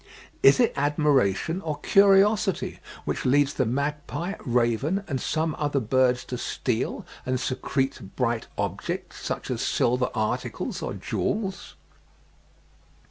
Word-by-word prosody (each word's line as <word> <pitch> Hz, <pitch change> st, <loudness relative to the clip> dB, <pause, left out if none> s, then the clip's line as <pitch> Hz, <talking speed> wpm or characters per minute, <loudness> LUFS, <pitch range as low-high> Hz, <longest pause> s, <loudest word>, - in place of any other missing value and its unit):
Is 135 Hz, -, +7 dB
it 240 Hz, -, +3 dB
admiration 145 Hz, -, +2 dB
or 155 Hz, -4 st, -3 dB
curiosity 200 Hz, +2 st, +4 dB, 0.3 s
which -, -, -2 dB
leads 145 Hz, +2 st, +3 dB
the 130 Hz, -, 0 dB
magpie, 150 Hz, -, -2 dB
raven, 125 Hz, -, +1 dB
and 135 Hz, -5 st, -2 dB
some 160 Hz, 0 st, -1 dB
other 145 Hz, -2 st, +1 dB
birds 125 Hz, +1 st, +2 dB
to 125 Hz, -, -5 dB
steal -, -, -2 dB, 0.2 s
and 130 Hz, 0 st, -1 dB
secrete 130 Hz, -3 st, -2 dB
bright 120 Hz, -3 st, 0 dB
objects, -, -, -3 dB
such -, -, -3 dB
as -, -, -2 dB
silver 125 Hz, +1 st, +1 dB
articles 110 Hz, -1 st, -2 dB
or -, -, -3 dB
jewels? 195 Hz, -3 st, -3 dB
140 Hz, 120 wpm, -26 LUFS, 125-165 Hz, 0.3 s, Is